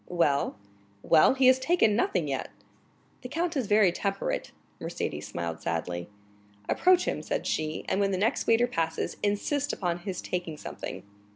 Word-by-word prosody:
"Well?" 145 - +1 0.5
"Well, 155 - +5
he 265 -1 +3
has 255 0 +7
taken 260 -7 +3
nothing 180 -8 +1
yet." 135 -2 -3 0.7
"The 250 - -7
count 335 +3 -1
is 260 -6 -1
very 205 -3 +5
temperate." 195 +2 -2 0.3
Mercédès - - -4
smiled 85 -1 -5
sadly. 85 +2 -3 0.6
"Approach 365 0 +4
him," - - -2
said - - -3
she, 155 0 -2
"and 190 - 0
when 200 -1 +2
the 190 - 0
next 220 +7 0
waiter 230 +1 +5
passes, 165 -9 -2
insist 265 +8 0
upon 175 -2 -2
his 185 0 -5
taking 175 -4 -4
something." - - -7
195 Hz, 160 wpm, -28 LUFS, 160-245 Hz, 0.7 s, has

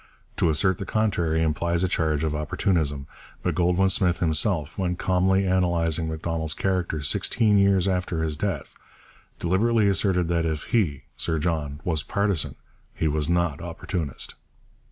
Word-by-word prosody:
To - - +2
assert 85 +4 +2
the 100 - -4
contrary 85 -7 +1
implies 85 +2 0
a - - +3
charge 80 -4 0
of 80 -1 0
opportunism; 75 -1 -1 0.4
but - - 0
Goldwin 90 +2 +2
Smith 90 -2 +2
himself, 80 0 0
when 90 -2 -1
calmly 95 +1 +2
analysing 85 -3 +1
Macdonald's 80 0 -2
character 90 -5 -1
sixteen 105 +8 +2
years 100 -1 +3
after 90 -3 -1
his 80 -1 -1
death, 75 - -3 0.6
deliberately 105 +5 +2
asserted 95 -2 +2
that 85 -1 +1
'if 80 -2 -2
he 80 - 0
[Sir 80 -1 -1
John] 75 -2 -2
was 80 -4 0
partisan, 100 -5 -1 0.4
he 80 - 0
was 75 0 0
not 85 -3 0
opportunist.' 85 -3 -4
85 Hz, 145 wpm, -25 LUFS, 80-95 Hz, 0.6 s, a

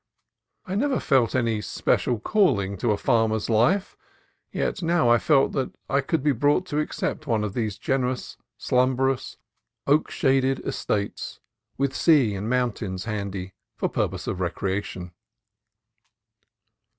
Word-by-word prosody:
I 185 - -5
never 265 +6 +1
felt 130 -4 +2
any 115 -4 +1
special 120 +2 0
calling 105 - +2
to 120 - -1
a 105 - +1
farmer's 110 0 +1
life; 175 - +2 0.6
yet - - -2
now 165 -6 +2
I 120 0 +5
felt 140 -3 +3
that 135 - -3 0.2
I 140 +1 +3
could 140 +1 -1
be 150 - +3
brought 145 +8 +2
to 150 - 0
accept 155 0 -3
one 110 -4 +1
of 105 -2 -3
these 110 -4 -2
generous, 130 -1 -2 0.2
slumberous, 130 +1 0 0.5
oak 145 +3 +3
shaded 135 -1 +2
estates, 100 -1 -3 0.4
with 135 -1 0
sea 140 -10 +4
and 100 +3 -4
moun 125 -1 +2
tains 95 -3 -6
handy 100 -4 -4 0.2
for - - -1
purposes - - -2
of 90 - -3
recreation. 95 0 -3
125 Hz, 140 wpm, -25 LUFS, 105-140 Hz, 0.6 s, I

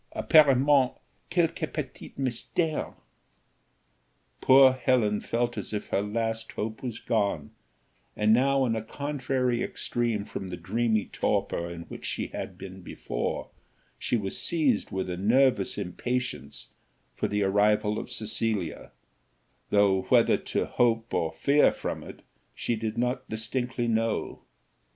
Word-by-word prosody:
Apparemment 140 -3 +5 0.4
quelque 165 -2 0
petit 150 -5 -6
mystère." 140 +5 -1 1.5
Poor 130 0 +7
Helen 125 -5 +1
felt 120 +1 -1
as - - -7
if 105 - -4
her - - +1
last 115 +2 -2
hope 110 +1 -4
was 120 -4 -4
gone, 100 -10 -1 0.6
and 105 +1 +3
now 135 +2 +3
in 115 -2 0
a 110 - -2
contrary 130 -1 -1
extreme 115 -5 -1
from 95 - -6
the 90 -1 -6
dreamy 110 +4 0
torpor 85 0 -1
in 85 -1 -7
which - - -10
she - - -3
had - - -6
been 95 0 -9
before, 90 - -4 0.5
she 120 - 0
was 100 -3 -3
seized 150 -10 +1
with 95 -1 -2
a 90 -1 -3
nervous 115 +1 +3
impatience 120 - -4 0.4
for - - -1
the 105 0 0
arrival 105 +2 +2
of - - -7
Cecilia, 110 -5 -3 0.8
though 100 -2 +4
whether - - +5
to - - -2
hope 115 -1 +1
or 80 - 0
fear 145 +1 +4
from - - -4
it, - - -11 0.3
she 120 - -1
did 110 0 -4
not 125 +2 -1
distinctly 120 +2 -2
know. 115 -1 -1
115 Hz, 130 wpm, -27 LUFS, 105-130 Hz, 1.5 s, Poor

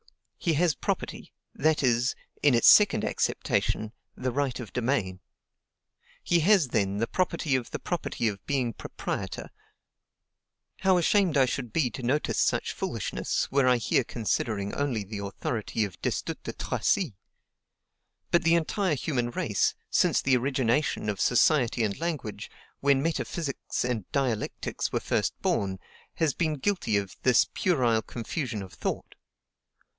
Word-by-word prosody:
He 170 - +1
has 170 +1 +3
property; - - -4 0.2
that 155 -1 +1
is, 120 -1 +2 0.3
in 145 -4 +5
its 115 - +4
second 210 -1 +7
acceptation, 110 -1 0 0.2
the 130 0 -2
right 135 -1 -1
of 115 -5 -8
domain. 115 -7 -1 1.0
He 175 - +3
has, 175 -4 +4
then, 100 -3 0
the 115 - +1
property 165 -3 0
of 125 -3 -2
the - - -4
property 170 -8 -2
of 100 -2 -3
being 130 -5 0
proprietor. - - -5 1.3
How 190 -1 +4
ashamed 175 -2 +3
I 135 - +6
should 125 -2 -3
be 130 -2 +1
to - - -7
notice 130 +5 0
such - - +1
foolishness, - - -2
were 135 -1 +3
I 125 -1 +5
here 120 +3 +1
considering 110 -3 -2
only 130 -7 -1
the 100 +1 -6
authority 105 +2 -2
of 95 -3 -10
Destutt - - -2
de - - -6
Tracy! 185 - 0 1.2
But 170 - +4
the 165 0 +4
entire 170 +1 +1
human 125 -4 -1
race, 120 - 0 0.2
since - - +3
the 130 -1 +4
origination 130 -1 0
of 100 -2 -2
society 125 -2 +3
and 100 -2 -2
language, 145 -12 -4 0.3
when 140 -1 +3
metaphysics 160 -5 -2
and 120 -6 -3
dialectics 125 -6 -2
were - - 0
first - - -1
born, 95 -2 0 0.4
has 160 -4 +1
been 155 +1 0
guilty 175 - 0
of 100 -2 -4
this 125 -2 +5
puerile 125 -11 +2
confusion 115 -2 -4
of 95 -1 -11
thought. - - -3
130 Hz, 145 wpm, -27 LUFS, 110-155 Hz, 1.3 s, second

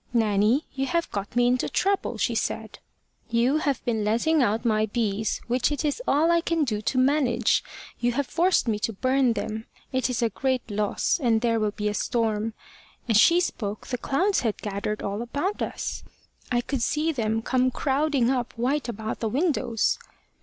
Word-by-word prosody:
`Nanny, 220 +5 +3
you 270 0 -2
have 340 +2 -1
got 200 +2 -5
me 245 0 +4
into 250 +1 +1
trouble,' 395 +1 0
she - - 0
said. - - -3 0.5
`You 245 +6 +3
have 280 -4 -1
been 225 -3 0
letting 235 +9 +2
out 225 0 +1
my 215 -1 +2
bees, 215 -2 -1
which 245 +3 +1
it 290 +1 -2
is 300 +11 -1
all 315 +4 +3
I 340 0 +3
can 330 -2 0
do 215 -6 -1
to 255 - -1
manage. 255 -3 +2 0.4
You 240 0 +1
have 280 +3 0
forced 350 0 +2
me 215 -2 0
to 225 - -1
burn 255 +3 +2
them. 220 0 -4 0.2
It 260 -2 0
is 245 -1 -1
a 230 - +2
great 260 0 -1
loss, 210 - 0
and 230 -4 +2
there 230 -1 +2
will 215 -1 +1
be 210 0 -3
a 210 - 0
storm.' 220 -1 -1 0.5
As 225 -3 +4
she 335 +10 +6
spoke, 215 - -3
the 250 - -3
clouds 380 +12 +1
had 225 -4 -1
gathered 205 +1 -3
all 200 +2 -2
about 285 - -2
us. - - -3 0.5
I 240 -1 +2
could 265 0 -3
see 305 +6 +1
them 225 -5 -1
come 255 +1 +2
crowding 270 -1 +1
up 250 -2 -2
white 255 +3 -1
about 220 -1 -4
the 225 - -1
windows. 255 -5 +1
240 Hz, 190 wpm, -25 LUFS, 220-275 Hz, 0.5 s, she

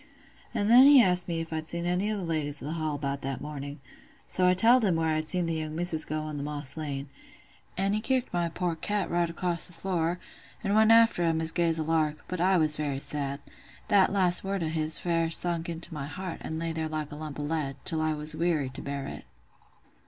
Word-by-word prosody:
"An' 210 -4 -1
then 250 +4 +8
he 285 -1 +8
asked 180 -6 +4
me 165 -2 -2
if 165 0 -7
I'd 160 0 0
seen 170 0 0
any 180 +4 0
of 215 - -1
the 195 - -4
ladies 150 -3 -2
o' - - -8
th' 155 - -3
Hall 155 -2 -2
about 140 -1 -3
that 135 -1 -4
mornin'; 145 0 -7 0.5
so 180 -1 +1
I 180 - +4
telled 235 +6 +5
him 190 -5 +2
where 165 0 0
I - - +1
had 155 0 -3
seen 180 -2 +2
the 165 - -2
young 155 -1 -4
misses 165 -2 +2
go 155 0 -3
on 155 -1 -5
th' - - -4
Moss 145 -2 -5
Lane;—an' 150 +6 -6
he 215 - 0
kicked 255 +1 -1
my 175 -1 0
poor 170 0 -2
cat 200 +3 -2
right 170 0 +1
across 170 0 +2
th' 180 - -13
floor, 170 -1 -1 0.5
an' 200 -1 0
went 220 +1 +5
after 230 -4 +5
'em 165 -1 +1
as 160 0 +3
gay 170 -1 +1
as 165 - +1
a 160 - -1
lark: 155 -1 -1
but 180 -2 -4
I 185 +1 +3
was 155 -2 +3
very 145 -3 -2
sad. 140 0 -3 0.5
That 195 -2 +4
last 185 -3 +2
word 195 -2 -2
o' 160 - -1
his 155 -1 -1
fair 165 -1 0
sunk 170 0 +1
into 170 +1 -7
my 140 -2 -5
heart, 180 +3 -6
an' 160 - -4
lay 165 0 -2
there 160 -1 -3
like 155 -1 -4
a - - -7
lump 150 -1 -7
o' - - -3
lead, 145 -3 -2
till 160 -1 +1
I 155 0 0
was 150 +1 -3
weary 160 -5 0
to 130 - -9
bear 140 -1 -5
it. - - -8
165 Hz, 245 wpm, -28 LUFS, 150-180 Hz, 0.5 s, then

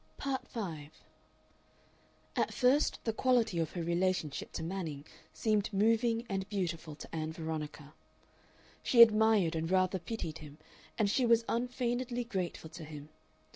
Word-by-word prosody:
Part 275 -1 -3
5 160 -9 -6 1.4
At - - +1
first 270 +3 +3
the 225 - -1
quality 230 -7 +2
of 160 -2 -1
her 175 - -3
relationship 170 -3 -1
to - - -4
Manning 165 -5 -4 0.3
seemed 215 -2 0
moving 225 +3 +2
and 195 -2 -3
beautiful 170 -6 -3
to 155 - -9
Ann 155 0 -2
Veronica. 155 -2 -5 0.9
She 235 -2 +8
admired 215 -6 +4
and 165 0 -2
rather 185 0 +2
pitied 165 -4 -5
him, 150 -1 -11 0.4
and 215 -3 +3
she 240 +6 +2
was 230 -1 +4
unfeignedly 245 0 -1
grateful 185 -7 -4
to 170 -1 -9
him. 150 -1 -9
190 Hz, 135 wpm, -32 LUFS, 160-230 Hz, 1.4 s, She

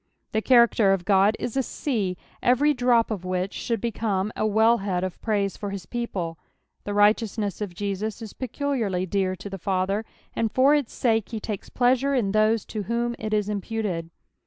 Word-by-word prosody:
Tho 220 - 0
character 235 -5 +5
of 180 -3 -2
God 200 +1 +4
is 245 - -4
a 270 - +3
sea, 215 -9 -2 0.2
ever^ 285 +5 +3
drop 245 -2 +3
of 200 -5 -3
which 185 +1 -2
should 230 -2 -2
become 215 -3 -1
a 215 - 0
wellhead 210 -4 +2
of 185 -1 -5
praise 205 -3 0
for 205 - -5
his 195 -3 -6
people. 180 -8 -4 0.5
The 205 - -3
righteoua 210 +2 +3
ness 205 -2 -2
of 195 -4 -4
Jesus 205 +2 -3
is 220 -3 -8
peculiarly 245 -8 -2
dear 190 0 0
to 195 - -9
the 195 -1 -6
Father, 195 +3 0 0.3
and 225 -2 0
for 265 +4 +5
its 290 -5 +1
sake 225 -4 +1
he 225 - -4
lakes 210 -4 -4
pleasure 260 +3 +2
in 215 -6 +1
those 215 +1 +2
to 215 - -4
whom 235 0 0
it 215 0 -4
is 210 -1 +1
imputed. 205 -4 -3
215 Hz, 185 wpm, -25 LUFS, 195-235 Hz, 0.5 s, character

